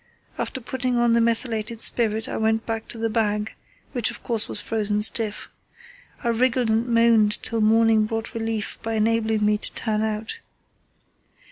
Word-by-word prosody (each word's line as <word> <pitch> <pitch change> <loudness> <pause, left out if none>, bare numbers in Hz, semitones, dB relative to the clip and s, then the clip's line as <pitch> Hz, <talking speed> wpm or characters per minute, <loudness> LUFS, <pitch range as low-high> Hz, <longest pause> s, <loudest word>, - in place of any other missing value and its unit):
After - - -3
putting 250 0 -2
on 240 -1 +3
the 235 - +3
methylated 230 -1 -1
spirit 220 -2 0
I - - -5
went 220 0 0
back 225 -1 -4
to - - -7
the 225 0 -1
bag, 215 -1 -1 0.4
which, 245 -3 +1
of 235 - -9
course, 230 -3 0
was - - -1
frozen 210 -1 0
stiff. 215 -1 +3 0.8
I 235 - 0
wriggled 240 0 +1
and 225 +2 +1
moaned 230 -3 +3
till 225 -1 -2
morning 220 0 +4
brought 225 0 -4
relief 225 -2 -3
by 225 0 -3
enabling 220 -1 +1
me 210 0 +2
to - - -5
turn 215 -2 -1
out. 220 0 -3
225 Hz, 165 wpm, -23 LUFS, 215-230 Hz, 0.8 s, morning